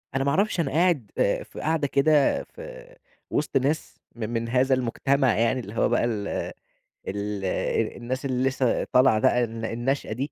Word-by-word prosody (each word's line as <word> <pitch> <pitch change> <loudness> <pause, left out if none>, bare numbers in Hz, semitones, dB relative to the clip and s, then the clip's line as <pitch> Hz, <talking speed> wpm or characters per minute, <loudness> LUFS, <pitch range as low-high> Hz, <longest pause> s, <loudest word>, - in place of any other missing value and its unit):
أنا 135 - +1
ما 140 - +1
اعرفش، 190 +4 +1
أنا 140 -5 0
قاعد 160 - +1
آآ، - - +1
في - - -11
قعدة 155 -2 0
كده 140 +1 +3
في - - -12 0.3
وسط 145 -1 0
ناس 140 +4 -1 0.2
م - - -17
من 115 0 -2
هذا 130 +2 +3
المجتمع 130 +1 +1
يعني، 115 +3 +2
اللي 105 -3 -8
هو - - +2
بقى 120 0 +2
ال 105 -4 -2 0.8
ال 100 0 -3 0.5
الناس 130 +3 -4
اللي 130 0 +1
لسه 130 -2 0
طالعة 125 -3 +4
بقى، 120 +2 +3
الن 115 0 -6
الناشئة 120 +2 -2
دي، 135 +5 -3
130 Hz, 175 wpm, -25 LUFS, 115-140 Hz, 0.8 s, طالعة